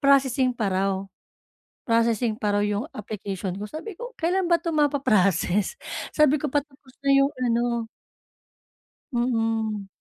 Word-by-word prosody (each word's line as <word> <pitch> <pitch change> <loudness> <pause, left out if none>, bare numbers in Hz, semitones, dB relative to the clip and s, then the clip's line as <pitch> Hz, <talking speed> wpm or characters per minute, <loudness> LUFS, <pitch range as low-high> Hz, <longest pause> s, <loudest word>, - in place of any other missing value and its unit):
processing 265 -2 +3
pa 210 -3 0
raw. 195 +1 +1 0.9
Processing 230 -1 +2
pa 210 -1 -1
raw 205 - +2
'yong 210 +9 -2
application 195 -3 -5
ko. 200 - -6
Sabi 365 +6 -7
ko, 485 +6 -7
"Kailan 360 +4 +1
ba 340 - +5
'to 335 - -3
mapa-process?" 210 - +2 0.3
Sabi 300 -1 +4
ko, 300 -1 -2
"Patapos 285 -2 -4
na - - +3
'yong 275 +1 +4
ano" 235 0 +2 1.5
Mm. 225 -4 0
235 Hz, 130 wpm, -25 LUFS, 210-290 Hz, 1.5 s, ba